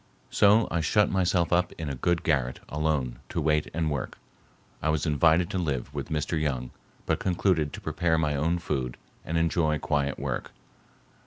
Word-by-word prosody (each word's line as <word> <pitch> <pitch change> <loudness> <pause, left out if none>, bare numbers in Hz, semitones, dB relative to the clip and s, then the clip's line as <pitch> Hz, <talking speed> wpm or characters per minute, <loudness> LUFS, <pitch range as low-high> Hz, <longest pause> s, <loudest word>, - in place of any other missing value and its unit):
So 105 +3 +5
I 85 - +1
shut 105 +6 +3
myself 90 -2 +1
up 90 +1 +2
in 80 - -6
a 70 - -2
good 85 +6 0
garret 65 -6 0
alone 75 -5 -1
to - - -2
wait 75 0 +1
and 80 -1 -1
work. 70 -4 -4 0.6
I 80 - 0
was 75 0 +1
invited 80 +3 +3
to 95 - -1
live 70 -5 -2
with 70 +2 -5
Mr. 75 +1 -1
Young 65 -5 -2 0.3
but - - 0
concluded 90 -5 +1
to - - -7
prepare 80 -1 0
my 75 -2 +1
own 80 +5 +1
food 65 -7 -3 0.3
and 80 - -2
enjoy 80 -2 +2
quiet 70 -1 -1
work. - - -4
80 Hz, 175 wpm, -27 LUFS, 75-85 Hz, 0.6 s, So